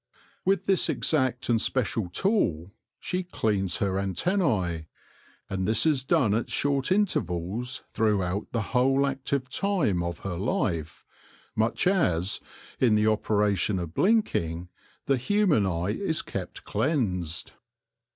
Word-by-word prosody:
With 195 +1 +2
this 195 -2 +2
exact 130 -5 0
and 115 -2 +2
special 115 -6 0
tool 95 - 0 0.3
she 180 - -2
cleans 105 - -1
her 95 -1 0
antennae, 95 - 0 0.6
and 95 -1 -2
this 110 +7 +3
is 145 -5 +2
done 130 -7 +2
at 115 +2 -1
short 140 +2 0
intervals 125 - -1
throughout 100 -3 0
the 115 -2 -1
whole 135 +2 +3
active 135 -1 -2
time 155 - 0
of 85 0 -4
her 90 -3 -4
life, 85 - -2 0.5
much 110 +9 +1
as, 100 - +2 0.4
in 120 -4 +4
the 105 0 +3
operation 105 -2 +2
of 85 -3 -5
blinking, 90 - +1 0.4
the 135 -1 +2
human 155 - +2
eye 85 +1 -1
is 160 - -1
kept - - -6
cleansed. 90 - -1
110 Hz, 125 wpm, -27 LUFS, 95-140 Hz, 0.6 s, in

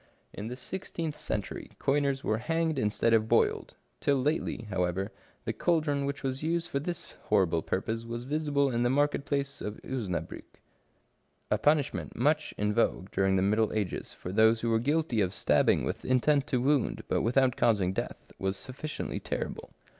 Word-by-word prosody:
In 105 - -5
the 125 - -4
sixteenth 165 +1 -4
century, 105 -3 -4
coiners 140 -1 +1
were 110 0 0
hanged 160 +2 0
instead 110 +1 +2
of 110 0 +3
boiled: - - +2 0.2
til! 140 -1 +2
lately, 145 -3 -1
however, 90 +1 -1 0.3
the - - -1
caldron 150 -5 +1
which 140 +1 -4
was 130 0 -2
used 170 +2 -1
for 140 - 0
this 170 +4 -5
horrible 90 -6 +3
purpose 110 +7 -2
was 120 +1 -5
visible 145 0 +1
in 120 -1 0
the 120 - +3
market 145 +1 +1
place 140 -1 -2
of 105 0 -5
Osnabriick. 110 -9 -4 0.9
A 105 - +3
punishment 145 +3 +1
much 150 +4 +1
in 105 0 +1
vogue 100 -4 +1
during 95 0 +2
the 95 - +2
middle 110 +2 +2
ages 105 -4 -2
for 90 - -7
those 110 +3 +4
who 115 - 0
were 115 - +3
guilty 145 -2 +1
of 95 0 0
stabbing - - +3
with - - -3
intent 140 +3 +2
to 130 - +1
wound, 140 +1 +1
but - - +1
without 125 +1 +3
causing 100 -6 +2
death, - - -5
was 95 0 -1
sufficiently 135 +7 -5
terrible. - - -4
125 Hz, 170 wpm, -29 LUFS, 105-145 Hz, 0.9 s, those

